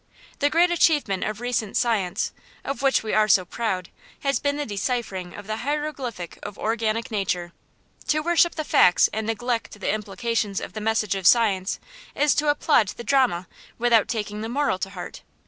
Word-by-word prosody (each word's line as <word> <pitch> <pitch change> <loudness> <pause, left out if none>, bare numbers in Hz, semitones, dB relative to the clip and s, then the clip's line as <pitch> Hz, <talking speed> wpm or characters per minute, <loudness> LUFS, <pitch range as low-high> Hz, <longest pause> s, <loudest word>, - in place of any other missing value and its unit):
The 290 - +3
great 345 +3 +3
achievement 295 - +2
of 215 0 -3
recent 240 -4 -1
science, 215 -7 0 0.3
of 275 -2 -4
which 270 -4 +3
we 220 - -3
are 215 0 +4
so 185 -2 +4
proud, 185 -2 -3 0.3
has 275 -2 +1
been 285 0 0
the 295 - -2
deciphering 200 -4 -3
of 205 - -9
the 215 +1 -3
hieroglyphic 270 - -4
of 205 -1 -8
organic 225 +1 -1
nature. 180 -4 -2 0.5
To 305 0 +2
worship 345 +1 +3
the 310 - -2
facts 180 -10 +5
and 220 0 -2
neglect 230 -1 -2
the 195 - 0
implications 210 0 -2
of - - -7
the 215 - -5
message 215 -2 +1
of 190 -2 0
science 205 -5 +3 0.4
is 295 0 +3
to 300 0 +1
applaud 290 -6 +3
the 235 - -7
drama 235 -8 +2 0.3
without 235 -2 +3
taking 210 -2 -3
the 225 - -4
moral 275 -6 0
to 195 - -3
heart. 180 -3 -8
225 Hz, 180 wpm, -24 LUFS, 200-270 Hz, 0.5 s, facts